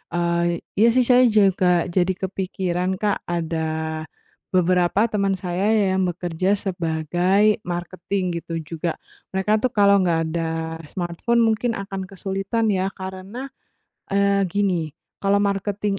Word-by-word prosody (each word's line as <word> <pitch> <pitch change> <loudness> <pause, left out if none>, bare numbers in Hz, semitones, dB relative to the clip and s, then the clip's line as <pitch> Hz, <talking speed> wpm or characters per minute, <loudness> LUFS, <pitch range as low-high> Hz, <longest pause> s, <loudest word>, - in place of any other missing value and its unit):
eee, 170 0 +1 0.4
iya 225 - +6
sih 255 - +5
saya 250 0 +7
juga 195 -2 +4 0.3
jadi 180 -2 +3
kepikiran 185 -1 -2
Kak, 205 -2 0
ada 170 -1 -2 1.0
beberapa 180 +1 +3
teman 200 -2 +1
saya 180 +1 -2
yang 190 -3 +2
bekerja 175 +2 -1
sebagai 180 +2 +1
marketing 180 +2 -3 0.2
gitu 165 - -8
juga. 165 +2 -3 0.4
Mereka 190 +2 0
tuh 255 - +2
kalau 200 -1 +6
nggak 170 -3 +2
ada 165 -1 -3
smartphone 180 +8 -1
mungkin 225 +2 +1
akan 195 -1 -5
kesulitan 195 +4 -2
ya, 190 -1 +1
karena, 190 +8 -7 0.6
eee, 200 0 +3
gini 180 -6 0 0.3
kalau 200 0 +3
marketing 200 0 -1
190 Hz, 125 wpm, -22 LUFS, 175-200 Hz, 1.0 s, saya